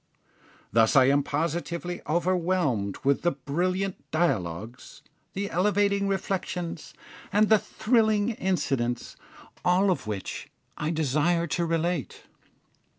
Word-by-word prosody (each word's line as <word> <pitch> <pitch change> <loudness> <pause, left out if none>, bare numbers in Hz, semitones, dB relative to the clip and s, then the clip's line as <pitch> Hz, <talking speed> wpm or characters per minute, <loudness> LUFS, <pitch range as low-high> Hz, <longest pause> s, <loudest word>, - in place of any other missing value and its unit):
Thus 115 +2 +4
I 130 -2 +7
am 140 +1 +4
positively 170 +4 -3
overwhelmed 170 - +1
with 140 0 +2
the 175 - +1
brilliant 180 +8 -1
dialogues, 115 - -2 0.3
the 200 +1 -3
elevating 200 +2 +2
reflections, 180 -4 -3 0.4
and 210 +1 +3
the 220 -1 +6
thrilling 220 -1 +1
incidents, 135 - -1 0.5
all 185 +2 +3
of 170 - -2
which 100 -3 -5 0.3
I 150 - -2
desire 160 +2 +1
to 170 +1 -1
relate. 165 -2 -2
170 Hz, 105 wpm, -27 LUFS, 140-190 Hz, 0.5 s, I